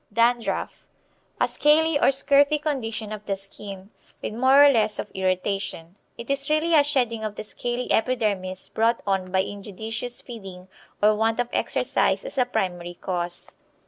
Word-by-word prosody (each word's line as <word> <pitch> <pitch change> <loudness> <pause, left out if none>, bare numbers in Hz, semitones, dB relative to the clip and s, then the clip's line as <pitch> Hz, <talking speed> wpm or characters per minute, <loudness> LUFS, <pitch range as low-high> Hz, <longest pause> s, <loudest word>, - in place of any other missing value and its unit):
Dandruff. 235 +2 0 0.6
A - - +3
scaly 305 0 +3
or - - +4
scurfy 280 +2 +4
condition 235 -8 -3
of 215 -1 -6
the 195 - 0
skin, 195 0 -9 0.3
with - - -5
more 265 +5 +6
or 285 - +7
less 215 -4 +2
of - - -5
irritation. 185 -2 -2 0.2
It 235 +3 -5
is 275 +1 -1
really 310 +2 +2
a 300 -2 +7
shedding 245 -6 0
of 215 -1 -4
the - - -6
scaly 240 +3 -4
epidermis 205 -6 0
brought 230 +1 +1
on 190 -2 -1
by 190 0 +2
injudicious 220 +4 -5
feeding 190 -6 -10 0.3
or 215 +1 +6
want 225 +2 +1
of 245 0 0
exercise - - 0
as - - -4
a 250 - +4
primary 175 -6 -3
cause. 175 -1 -4
225 Hz, 160 wpm, -24 LUFS, 195-260 Hz, 0.6 s, or